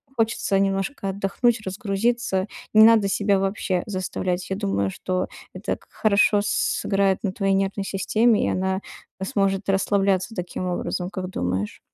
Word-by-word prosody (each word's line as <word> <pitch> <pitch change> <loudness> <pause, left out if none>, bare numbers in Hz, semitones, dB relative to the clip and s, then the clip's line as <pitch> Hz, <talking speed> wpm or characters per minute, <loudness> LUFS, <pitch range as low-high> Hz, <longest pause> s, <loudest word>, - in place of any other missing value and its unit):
хочется 220 -4 +1
немножко 195 +2 -1
отдохнуть, 205 +5 +1
разгрузиться. 195 0 -1 0.3
Не 215 0 +8
надо 225 -3 +5
себя 200 0 +2
вообще 190 -2 -1
заставлять. 185 -2 -2
Я 190 - -1
думаю, 100 - -1
что 185 - -2 0.3
это 185 +4 -3
как - - -26
хорошо 205 -1 +3
сыграет 195 -1 +1
на 195 - 0
твоей 195 -1 0
нервной 195 +1 0
системе, 215 +4 +2
и - - +1
она, 190 +1 -1 0.4
э, 190 - -3
сможет 195 0 0
расслабляться 195 +1 +1
таким 180 0 -4
образом. 180 0 -2
Как 185 -2 -5
думаешь? 95 - -2
195 Hz, 145 wpm, -23 LUFS, 185-205 Hz, 0.4 s, Не